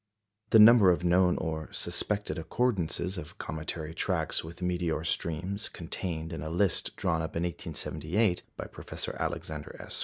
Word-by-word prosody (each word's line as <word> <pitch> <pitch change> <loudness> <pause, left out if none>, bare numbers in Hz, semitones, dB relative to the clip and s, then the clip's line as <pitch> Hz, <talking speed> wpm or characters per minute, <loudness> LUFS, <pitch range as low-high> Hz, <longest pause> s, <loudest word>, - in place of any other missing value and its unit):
The - - +7
number 110 -2 +9
of 90 -1 +2
known 90 0 +4
or 80 -1 -3
suspected 105 -2 -1
accordances 90 -2 -1
of 75 - -10
cometary 80 0 -4
tracks 85 -2 0
with 85 +3 -8
meteor 90 -3 0
streams 85 +5 -1
contained 80 -1 -4
in - - -4
a 80 - -4
list 90 +3 +1
drawn 80 -1 0
up 80 - -5
in 85 - 0
1878 90 +3 -1 0.2
by - - -4
Professor - - -5
Alexander 75 -2 -4
S. - - -5
85 Hz, 150 wpm, -30 LUFS, 80-95 Hz, 0.2 s, number